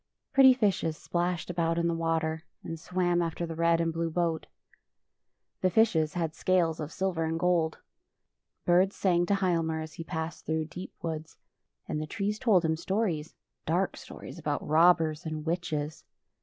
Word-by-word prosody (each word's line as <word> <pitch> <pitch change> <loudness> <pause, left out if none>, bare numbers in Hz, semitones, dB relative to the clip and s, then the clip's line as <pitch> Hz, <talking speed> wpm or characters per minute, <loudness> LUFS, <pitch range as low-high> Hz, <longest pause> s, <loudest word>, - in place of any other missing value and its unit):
Pretty 265 -2 +8
fishes 190 -9 +1
splashed 175 0 -2
about 165 -1 0
in 170 0 +2
the 170 - +1
water, 160 -1 -1 0.2
and 165 -1 -6
swam 175 0 +1
after 170 0 -2
the 165 - -5
red 170 0 +3
and 165 -1 0
blue 165 0 -1
boat. 165 -1 -1 1.1
The 185 - +3
fishes 175 -7 +3
had 165 -3 -1
scales 170 -3 +1
of 155 0 -4
silver 185 -4 -1
and 160 0 -1
gold. 170 -2 +2 0.9
Birds 185 +3 +4
sang 175 -2 +2
to 200 - +3
Hialmar 165 -4 0
sls 155 - -9
he 165 - -4
passed 160 0 -5
through 160 0 0
deep 180 +4 -8
woods, 160 -1 -5 0.5
and 150 - -2
the 155 - -4
trees 210 +5 -2
told 195 -8 +4
him 160 0 +2
stories 175 -4 -1 0.2
— - - -53
dark - - +1
stories - - -10
about - - -2
robbers 160 0 +4
and 155 -1 -4
witches. 160 -3 -2
165 Hz, 170 wpm, -29 LUFS, 160-180 Hz, 1.1 s, Pretty